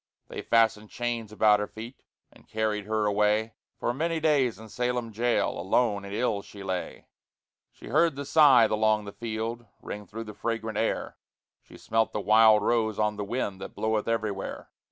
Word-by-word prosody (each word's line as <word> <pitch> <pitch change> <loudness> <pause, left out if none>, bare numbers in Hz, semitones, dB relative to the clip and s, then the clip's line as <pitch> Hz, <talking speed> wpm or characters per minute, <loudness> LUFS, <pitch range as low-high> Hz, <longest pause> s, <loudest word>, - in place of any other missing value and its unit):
They - - -6
fastened 110 -2 +2
chains 120 -3 -3
about 105 -1 +4
her 105 - -2
feet, 115 +4 -10 0.3
And - - -21
carried 110 -2 -1
her 110 0 0
away; 105 +2 +1 0.3
For 120 - -1
many 165 +4 -1
days 140 -8 +2
in 110 +1 -11
Salem 125 0 -2
jail 120 +3 +1
Alone 100 +2 0
and 100 - -8
ill 105 -1 -1
she 100 0 -12
lay 95 -2 -4 0.7
She - - -13
heard 155 +3 +3
the 140 +1 -5
scythe 135 -7 +6
along 110 0 +2
the 100 - -7
field 115 +1 -5
Ring 105 0 -8
through 115 +2 -7
the 105 -1 -9
fragrant 110 -1 -3
air, 115 - -2 0.4
She - - -16
smelt 110 0 0
the - - -1
wild 110 0 +5
rose 110 -3 +1
on 105 0 0
the 105 - -4
wind 100 -3 -3
That - - -8
bloweth 110 -1 -1
everywhere. 110 -4 -3
110 Hz, 175 wpm, -27 LUFS, 105-120 Hz, 0.7 s, scythe